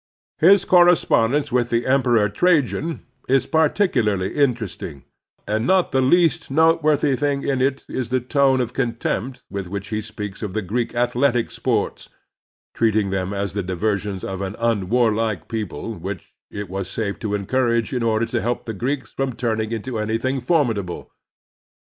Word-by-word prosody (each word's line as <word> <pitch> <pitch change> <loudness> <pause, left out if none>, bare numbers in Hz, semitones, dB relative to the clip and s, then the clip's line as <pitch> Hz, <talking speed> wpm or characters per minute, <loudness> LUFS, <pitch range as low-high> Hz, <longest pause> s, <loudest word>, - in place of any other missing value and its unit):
His 190 +3 +6
correspondence 150 -6 +4
with 120 -1 +1
the 115 0 0
Emperor 125 -5 +3
Trajan 150 - +1 0.2
is 135 0 +3
particularly 145 - +1
interest 120 -9 0
ing; 70 -6 -7 0.4
and 110 +3 0
not 185 -1 +3
the 135 - +2
least 165 +5 +3
noteworthy 155 -2 +3
thing 140 +1 -1
in 135 -2 0
it 135 +1 0
is 125 -3 -4
the 130 +1 +1
tone 135 +1 +2
of 120 0 -3
contempt 125 0 -2
with 100 -2 -4
which 100 +2 -6
he 110 0 -2
speaks 105 -2 -7
of 105 -4 -4
the 110 0 -2
Greek 115 +6 -2
athletic 120 0 +1
sports, - - -2 0.6
treating 110 -3 +1
them 95 0 -2
as 100 -1 -3
the 100 - -1
diver 95 +3 0
sions 100 -2 -6
of 95 0 -4
an 100 +1 -4
imwarlike 110 -3 0
people 110 0 -4
which 95 -1 -7 0.2
it 105 0 -6
was 95 0 -4
safe 100 -1 -3
to 105 -3 -2
encoiuage 115 +2 0
in 125 - -1
order 115 0 +1
to 120 0 -2
keep 120 +1 -2
the 115 - -4
Greeks 130 +6 -3
from 135 -1 -2
ttiming 110 -2 -1
into 115 +1 -3
anything 115 +5 -1
formidable. 120 - -1
115 Hz, 160 wpm, -22 LUFS, 105-135 Hz, 0.6 s, His